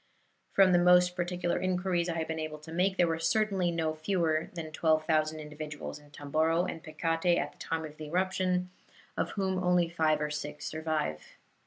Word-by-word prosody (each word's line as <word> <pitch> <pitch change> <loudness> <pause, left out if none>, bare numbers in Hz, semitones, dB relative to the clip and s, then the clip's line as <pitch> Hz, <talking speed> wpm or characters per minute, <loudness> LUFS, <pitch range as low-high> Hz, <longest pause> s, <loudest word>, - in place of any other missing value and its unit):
From 195 -2 +6
the 175 - +5
most 180 0 +5
particular 175 -1 -1
inquiries 180 -1 0
I 170 - -2
have 160 -1 -2
been 160 0 -3
able 155 -1 -4
to 155 +2 -12
make, 190 +3 +1
there 175 - +4
were 165 0 -1
certainly 190 +1 +1
no 165 -2 -1
fewer 160 -1 0
than 160 -2 -5
12,000 155 0 +1
individuals 150 0 -7
in 145 0 -19
Tomboro 160 +4 +1
and 165 - -5
Pekate 165 +2 +1
at - - -1
the - - -26
time 160 -1 -3
of 155 0 -10
the 155 - -7
eruption, 180 +2 0 0.4
of - - -1
whom 190 -2 0
only 180 -1 +3
five 160 -3 +2
or 150 0 -2
six 150 0 -5
survive. 155 - -3
165 Hz, 185 wpm, -30 LUFS, 155-180 Hz, 0.4 s, From